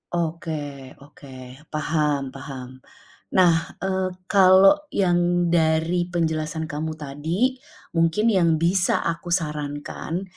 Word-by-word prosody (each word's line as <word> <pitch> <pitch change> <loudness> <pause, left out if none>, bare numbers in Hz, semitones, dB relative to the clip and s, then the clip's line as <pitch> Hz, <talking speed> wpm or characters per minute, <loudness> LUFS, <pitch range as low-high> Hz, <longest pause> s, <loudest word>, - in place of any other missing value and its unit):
Oke, 165 -1 -2 0.5
oke. 145 0 -16 0.4
paham, 150 -3 -1
paham. 130 -2 -9 0.6
Nah, 180 -3 +6 0.3
eee, 190 -1 0 0.2
kalau 195 +9 +6
yang 175 - +1
dari 165 +1 +1
penjelasan 160 -2 -2
kamu 155 +2 -4
tadi, 160 - -2 0.3
mungkin 170 +7 +2
yang 170 -5 +3
bisa 175 +3 +1
aku 170 +1 -3
sarankan, 150 +2 -4
165 Hz, 100 wpm, -23 LUFS, 155-180 Hz, 0.6 s, Nah